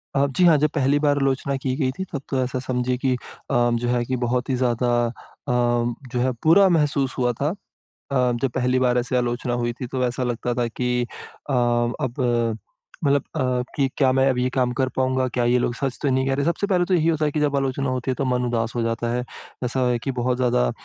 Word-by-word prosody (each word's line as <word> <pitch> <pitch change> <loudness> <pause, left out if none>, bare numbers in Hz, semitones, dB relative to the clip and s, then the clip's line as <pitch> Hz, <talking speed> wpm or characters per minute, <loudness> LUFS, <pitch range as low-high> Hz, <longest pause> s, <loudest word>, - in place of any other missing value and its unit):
अ, 140 - +4
जी। 140 +7 0
हाँ, 165 -3 +6
जब 150 +1 +2
पहली 140 0 +3
बार 145 -1 +2
आलोचना 135 0 0
की 130 -1 -2
गई 130 -4 +1
थी 190 - -2
तब 140 - -3
तो 135 -2 0
ऐसा 130 0 -3
समझिए 125 0 -1
की 130 0 +1
अ, - - -4 0.4
जो 120 0 +2
है 120 0 +1
कि 130 - -1
बहुत 125 +2 -1
ही 130 - +1
ज़्यादा 125 -1 +1 0.2
अ, 115 - -4 0.4
जो 120 +1 0
है 130 +1 +2
बुरा 190 +5 +7
महसूस 145 -5 +1
हुआ 125 -1 +2
था। 145 - +2 0.6
अ, 125 -2 +2
जब 135 - +1
पहली 125 0 +2
बार 125 -1 +2
ऐसे 125 +1 -1
आलोचना 120 0 -1
हुई 120 0 -1
थी 125 - -3
तो 130 0 -2
ऐसा 125 +1 -2
लगता 120 0 -2
था 120 -1 0
कि 125 +1 -1 0.5
अ, - - 0
अब 120 +1 0 0.8
मतलब 140 -2 +3
अ, - - 0 0.3
कि 135 -2 +1
क्या 130 -3 +4
मैं 135 +1 +3
अब 130 - 0
ये 125 +1 +1
काम 125 -1 +2
कर 130 -1 +2
पाऊँगा 130 0 +1
क्या 120 0 -1
ये 125 +1 +3
लोग 120 - 0
सच 135 -1 -2
तो 145 - +1
नहीं 130 +1 +1
कह 135 - +1
रहे। 140 0 -1
सबसे 170 +4 0
पहले 180 -3 +2
तो 185 - -1
यही 165 -2 +3
होता 155 -2 +2
है 150 - 0
कि 155 - -1
जब 145 -1 +1
आलोचना 135 0 -1
होती 130 0 -1
है - - -2
तो 140 - -2
मन 125 -1 0
उदास 115 -1 -1
हो 120 - 0
जाता 115 +1 -1
है। 125 0 -1 0.4
ऐसा 125 +1 0
है 120 - +1
कि 135 - -3
बहुत 125 +1 0
ज़्यादा 120 - +2
130 Hz, 240 wpm, -23 LUFS, 125-135 Hz, 0.8 s, बुरा